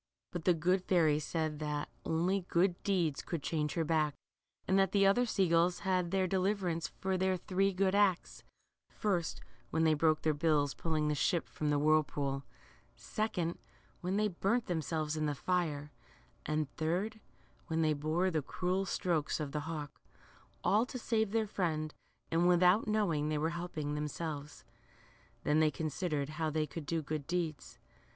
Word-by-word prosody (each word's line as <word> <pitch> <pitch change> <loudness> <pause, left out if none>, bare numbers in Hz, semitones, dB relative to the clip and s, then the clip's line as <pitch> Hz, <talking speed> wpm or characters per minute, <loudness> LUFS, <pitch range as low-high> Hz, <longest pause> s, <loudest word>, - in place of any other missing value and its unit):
But 175 -3 -5
the 180 - +5
good 180 +3 +1
fairy 160 -5 +3
said 155 0 -2
that 150 -1 -2 0.2
only 180 +3 0
good 175 +1 +2
deeds 175 -8 0
could 165 -5 -4
change 150 -2 -1
her 165 - +1
back, 155 -2 +1 0.5
and 190 +1 +4
that 195 -1 +2
the 200 -1 +5
other 240 +6 +4
sea 195 -4 +2
gulls 170 +2 +3
had 185 -2 +1
their 190 +1 +1
deliverance 185 -3 0
for 190 -1 -2
their 190 0 +2
three 195 +2 +1
good 190 0 +1
acts; 200 -3 +1 0.5
first, 180 -6 -1 0.3
when 160 - +1
they 160 -1 +5
broke 155 0 +2
their 155 - +3
bills 145 -2 +2
pulling 155 -2 -1
the 150 - +2
ship 170 +3 +1
from 150 - -2
the 145 - +3
whirlpool; 145 -2 +1 0.5
second, 175 - -2 0.4
when 185 +3 -1
they 215 0 +3
burnt 205 +5 0
themselves 160 -2 -1
in 155 -1 0
the 145 - -1
fire; 150 -3 -1 0.6
and 155 -1 0
third, 185 +8 -1 0.5
when 160 -1 +1
they 155 -1 +3
bore 155 +6 0
the 155 -2 0
cruel 185 +6 -1
strokes 165 -5 0
of 150 -2 -3
the 150 +1 -3
hawk; 150 -3 -6 0.6
all 210 +3 +4
to 255 - -5
save 220 -3 0
their 220 +1 +1
friend, 160 -6 -2 0.4
"^nd 170 +2 +3
without 180 +4 +5
knowing 175 -9 +1
they 155 - 0
were 160 +2 0
helping 170 -4 -4
themselves. 150 0 -5 0.8
Then 150 +1 +3
they 155 -1 +5
considered 150 -1 -2
how 155 0 -2
they 155 0 0
could 150 -1 -8
do 165 -2 -1
good 150 -1 -4
deeds. 165 -3 -3
165 Hz, 170 wpm, -33 LUFS, 155-185 Hz, 0.8 s, the